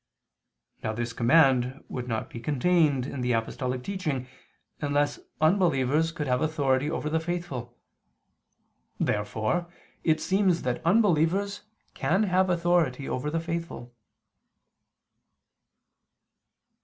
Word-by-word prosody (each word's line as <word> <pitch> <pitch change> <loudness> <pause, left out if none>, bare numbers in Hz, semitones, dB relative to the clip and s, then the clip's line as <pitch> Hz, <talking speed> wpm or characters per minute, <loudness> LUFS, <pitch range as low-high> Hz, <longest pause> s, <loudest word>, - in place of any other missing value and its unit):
Now 110 - -1
this 120 +1 -3
command 130 +1 +3
would 125 -1 -5
not 110 -2 -2
be 115 - -7
contained 145 +1 +2
in 140 -1 -5
the 125 0 +1
apostolic 125 +2 -2
teaching 155 -9 -3 0.5
unless 145 0 0 0.2
unbelievers 155 -3 +2
could 160 -3 -4
have 125 -1 +1
authority 145 -3 +1
over 155 - -3
the 160 +1 +1
faithful. 160 -8 -5 1.2
Therefore 110 +11 -1 0.3
it 155 -1 +2
seems 190 -3 +1
that 125 -1 -2
unbelievers 195 +1 +2 0.3
can 190 +6 +1
have 185 -1 +2
authority 170 -6 +1
over 130 +4 -2
the 165 +2 -1
faithful. 165 -7 -5
150 Hz, 105 wpm, -27 LUFS, 125-175 Hz, 1.2 s, command